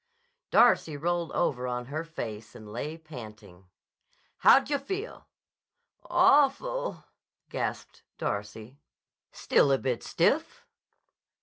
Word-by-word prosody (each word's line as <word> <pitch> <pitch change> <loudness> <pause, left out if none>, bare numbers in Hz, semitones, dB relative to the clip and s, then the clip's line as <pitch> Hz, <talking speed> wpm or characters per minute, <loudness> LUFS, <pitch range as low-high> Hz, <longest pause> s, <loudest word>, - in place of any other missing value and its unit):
Darcy 155 -3 +4
rolled 170 +2 -1
over 125 -7 0
on 125 0 -3
her 150 +5 -4
face 115 -9 -7
and 105 -2 -11
lay 150 +7 -5
panting. 110 - -12 0.7
"How - - +7
d' 270 +1 -2
yah 285 - +1
feel?" 390 - -6 0.8
"Awful!" 370 - +2 0.5
gasped - - -4 0.2
Darcy. 110 +6 -5 0.5
"Still 140 - +2
a 135 - +4
bit 130 -3 -2
stiff?" 325 - 0
155 Hz, 105 wpm, -28 LUFS, -, 0.8 s, How